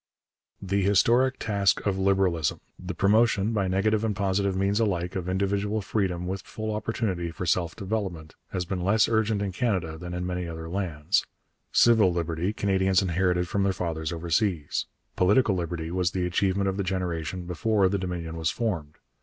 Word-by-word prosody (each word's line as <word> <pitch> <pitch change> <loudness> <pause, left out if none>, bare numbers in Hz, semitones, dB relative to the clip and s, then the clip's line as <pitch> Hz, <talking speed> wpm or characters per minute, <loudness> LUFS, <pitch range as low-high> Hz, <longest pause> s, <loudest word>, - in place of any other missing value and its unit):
The 100 +1 -1
historic 120 +7 +3
task 100 -3 +1
of 100 -2 +1
Liberalism 95 -5 +1 0.2
the 90 -1 -6
promotion, 105 +2 +3
by 100 -3 +1
negative 105 +3 +1
and 110 -2 0
positive 100 0 0
means 100 +2 +1
alike, 90 -5 0
of 90 -1 -3
individual 100 +3 0
freedom 95 -4 -1
with 95 +1 -3
full 110 +3 -5
opportunity 105 -5 -2
for 85 +2 -5
self 85 0 0
development 95 -6 -4 0.2
has 90 -1 -3
been 90 +1 -3
less 100 +4 +3
urgent 110 -2 +1
in 100 - -2
Canada 90 -8 -1
than 90 0 -6
in 90 0 -3
many 90 -1 -3
other 80 0 -6
lands. 85 -5 0 0.5
Civil 110 -6 +5
liberty 85 +2 -1
Canadians 95 -2 +2
inherited 90 0 +1
from 100 - -1
their 95 -1 +2
fathers 80 -3 -3
overseas. 85 -1 -1 0.3
Political 100 +4 +4
liberty 85 -2 -3
was 90 -1 +1
the 90 0 -2
achievement 95 +2 +1
of 95 0 -1
the 100 - 0
generation 90 -2 -3
before 100 +3 +1
the 100 +1 0
Dominion 85 -3 -4
was 80 -1 0
formed. 85 -11 -3
95 Hz, 170 wpm, -26 LUFS, 85-100 Hz, 0.5 s, Civil